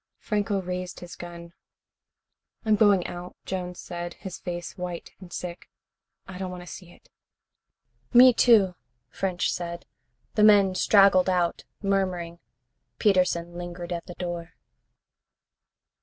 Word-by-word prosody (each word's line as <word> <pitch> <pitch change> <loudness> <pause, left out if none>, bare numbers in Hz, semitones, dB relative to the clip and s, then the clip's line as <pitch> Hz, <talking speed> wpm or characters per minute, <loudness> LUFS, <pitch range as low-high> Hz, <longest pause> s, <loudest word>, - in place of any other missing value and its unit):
Franco 205 -1 -1
raised 180 0 -5
his 175 -1 -9
gun. 170 -1 -10 1.1
"I'm 215 -1 +4
going 205 -4 +4
out," 175 +1 -7
Jones 180 -1 -4
said, 175 -1 -6
his 190 -2 -8
face 175 -1 -5
white 180 -2 -6
and 185 -2 -12
sick. 175 0 -6 0.6
"I 185 -1 -8
don't 190 -1 -3
want 180 -1 -7
to - - -12
see 180 -1 -10
it." - - -21 1.0
"Me, 250 +1 +8
too," 215 -6 +5 0.4
French 185 -2 -1
said. 170 -1 -5 0.5
The 210 - +3
men 200 -3 +6
straggled 195 -1 +5
out, 180 -2 0 0.2
murmuring. 185 -4 -1 0.6
Peterson 180 -4 +2
lingered 175 0 -6
at 170 - -5
the 175 - -8
door. 175 -2 -5
180 Hz, 125 wpm, -26 LUFS, 175-195 Hz, 1.1 s, Me